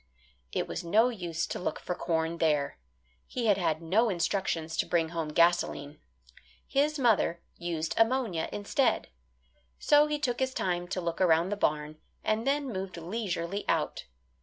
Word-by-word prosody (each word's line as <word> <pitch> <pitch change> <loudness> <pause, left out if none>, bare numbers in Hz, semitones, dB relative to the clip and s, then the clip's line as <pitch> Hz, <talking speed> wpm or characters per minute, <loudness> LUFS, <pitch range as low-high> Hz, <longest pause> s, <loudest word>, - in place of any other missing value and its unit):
It - - -1
was - - -4
no 215 +8 +4
use 175 -8 -3
to - - -5
look 180 - -2
for 180 - -3
corn 165 -1 -1
there. 150 - +1 0.5
He 245 - -3
had 205 -3 +4
had 160 -2 0
no 215 +8 +3
instructions 170 -3 -1
to - - +1
bring 165 -2 +1
home 165 -2 -3
gasoline. 155 -3 +2 0.7
His 295 +2 +1
mother 220 -9 +2
used 165 -2 -3
ammonia 225 -8 +2
instead. 205 +6 0 0.7
So 295 0 +5
he 300 0 -1
took 255 -5 -1
his 260 0 -1
time 175 -1 -1
to 185 0 -3
look 170 +1 -3
around 170 0 +4
the 205 - -1
barn, 150 -4 -1 0.2
and 220 +4 0
then 280 -3 0
moved 190 -1 -5
leisurely 180 0 -3
out. - - 0
180 Hz, 160 wpm, -29 LUFS, 165-225 Hz, 0.7 s, So